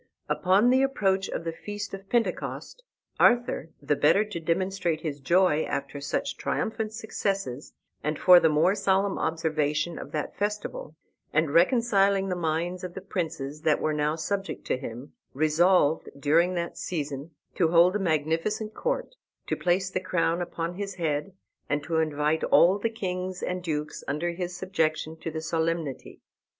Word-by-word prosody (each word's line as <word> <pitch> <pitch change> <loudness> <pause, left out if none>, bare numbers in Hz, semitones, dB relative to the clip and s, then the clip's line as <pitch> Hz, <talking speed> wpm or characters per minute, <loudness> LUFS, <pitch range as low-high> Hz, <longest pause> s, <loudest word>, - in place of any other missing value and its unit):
Upon 200 +6 +3
the 260 +1 +4
approach 195 -8 +1
of - - -4
the 165 - -2
feast 205 +5 -6
of 195 0 -8
Pentecost, 245 - -2 0.4
Arthur, 240 -8 +3
the 145 +1 +2
better 195 +9 +4
to 210 -5 -5
demonstrate 170 0 -1
his 150 -3 -4
joy 165 +2 +3
after 140 0 -4
such 145 - -2
triumphant 220 -1 -2
successes, 195 - -3 0.3
and 150 0 -1
for 180 -1 +8
the 160 - +4
more 155 +5 +3
solemn 195 -1 +1
observation 155 0 -1
of - - -8
that 150 -1 -3
festival, 205 -6 -3 0.4
and 155 -1 +1
reconciling 195 -1 +3
the 180 - 0
minds 175 +2 -2
of 180 -1 -6
the - - -4
princes 155 -6 -4
that 155 -2 +2
were 155 - 0
now 150 +1 0
subject 195 +5 -3
to - - 0
him, 125 +1 -8 0.2
resolved 155 +1 +3
during 170 +6 +3
that 170 0 -3
season 145 -3 -4 0.2
to 170 - +2
hold 170 +3 +5
a - - +1
magnificent 165 +6 0
court, - - -2 0.3
to - - -1
place 185 +1 0
the 185 - 0
crown 175 -2 0
upon 170 -1 -3
his 195 0 -5
head, 160 +1 -1 0.4
and 145 0 0
to 160 +2 -1
invite 155 0 +1
all 185 +4 +5
the 230 - 0
kings 185 -4 -4
and 180 0 -2
dukes 150 -3 -4
under 155 +5 -1
his 180 +1 -5
subjection 160 -4 -1
to 165 - -6
the 160 0 -4
solemnity. 160 -3 -2
170 Hz, 160 wpm, -27 LUFS, 155-195 Hz, 0.4 s, for